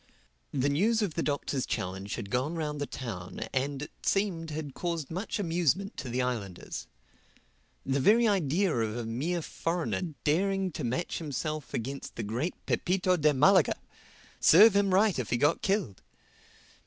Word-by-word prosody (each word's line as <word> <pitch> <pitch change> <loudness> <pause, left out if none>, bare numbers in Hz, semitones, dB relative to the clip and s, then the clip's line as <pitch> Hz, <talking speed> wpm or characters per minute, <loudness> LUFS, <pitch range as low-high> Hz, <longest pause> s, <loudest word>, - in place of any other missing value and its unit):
The 135 -1 +1
news 210 +10 +2
of 190 -6 -2
the 165 - -1
Doctor's 140 -3 -1
challenge 95 +2 -3
had 100 - -7
gone 135 +7 0
round 150 -3 -3
the 145 - -1
town 95 -8 -6
and, 135 +1 -1
it - - -8
seemed, 185 -5 0
had 150 -2 -5
caused 165 -4 -3
much 190 +8 -3
amusement 180 - 0
to 140 - -5
the 125 +2 0
islanders. 105 - -4 1.0
The 135 +1 +1
very 225 - +5
idea 185 -2 +2
of 110 -1 -1
a 120 - -3
mere 155 +10 -2
foreigner 165 0 -2
daring 190 +4 +1
to 155 - -5
match 125 +8 -2
himself 155 -1 -4
against 135 +4 -5
the 115 - -3
great 120 - -2
Pepito 185 0 +1
de 155 -3 +3
Malaga!—Serve 195 +6 +4
him 200 -1 +3
right 195 -3 +3
if 125 - -3
he 120 - +1
got 145 +6 +2
killed! 190 - -1
150 Hz, 155 wpm, -29 LUFS, 130-185 Hz, 1.0 s, very